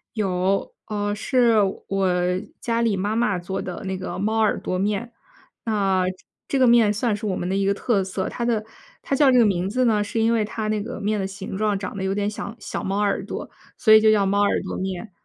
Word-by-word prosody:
有， 190 -1 0
呃， 205 -1 -2
是 240 0 +2 0.3
我 195 -1 +1 0.5
家 230 0 -1
里 220 -4 +1
妈 205 +3 -1
妈 215 -5 +1
做 180 +2 -4
的 180 -2 -6
那 190 0 -2
个 185 - -5
猫 220 +3 0
耳 215 - +2
朵 185 - -2
面。 210 +4 -1 0.5
那 195 -4 +1 0.4
这 275 - 0
个 260 - +5
面 235 -3 +5
算 215 0 0
是 215 +1 -6
我 195 - -1
们 175 - -3
的 190 - -1
一 195 0 +1
个 200 - +3
特 200 -2 0
色， 190 0 -3
它 240 - -4
的 220 -3 0 0.4
它 275 - -1
叫 275 -2 +5
这 250 - +4
个 235 - +6
名 190 -1 0
字 255 +3 +1
呢， 210 -3 +3
是 225 +2 -3
因 230 +1 +3
为 220 -2 +2
它 215 0 -4
那 215 -1 0
个 240 +4 -6
面 210 0 -1
的 190 - -1
形 195 0 -7
状 210 -2 +1
长 195 +1 -6
得 190 - -3
有 190 +1 -1
点 205 0 0
像 220 +2 -6
小 - - -5
猫 195 +1 -1
耳 205 -1 0
朵， - - -6 0.3
所 215 -2 +5
以 215 - +9
就 220 0 +5
叫 205 -2 +3
猫 200 +1 +2
耳 205 - +2
朵 190 - -5
面。 190 +2 -4
205 Hz, 255 characters per minute, -23 LUFS, 195-225 Hz, 0.5 s, 以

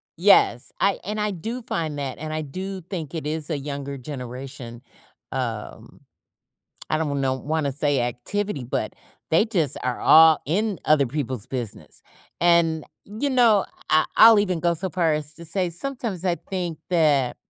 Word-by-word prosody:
Yes, 170 -9 +4
I 200 - +2
and 210 +3 -4
I 210 0 0
do 225 +7 -5
find 160 -10 -3
that, 140 -2 -4
and 155 +1 -5
I 155 0 -2
do 190 +6 -6
think 170 -3 -6
it 160 - -4
is 155 +1 -2
a 155 - -1
younger 140 0 -5
generation, 125 -2 -8 0.5
um, 115 -5 -5 0.9
I - - +1
don't 145 -3 -1
know 130 -1 +1
wanna 145 +1 -2
say 145 -1 +1
activity, 130 - -3
but 120 - -3 0.4
they 165 +7 +4
just 170 - 0
are 125 -1 -2
all 160 -1 +7
in 200 +5 0
other 150 -2 +5
people's 130 -5 -4
business. 120 -5 -6 0.4
And, 170 -2 +3 0.2
you 215 +8 -3
know, 235 -6 +4 0.2
I 155 0 +4
I'll 225 -1 +9
even 185 -5 -1
go 170 0 +2
so 185 +3 -3
far 170 -2 +1
as 150 0 -3
to 170 - -10
say, 180 +2 -1
sometimes 210 0 -3
I 175 -2 +1
think 175 -5 -5
that 150 -7 +2
160 Hz, 165 wpm, -23 LUFS, 140-185 Hz, 0.9 s, I'll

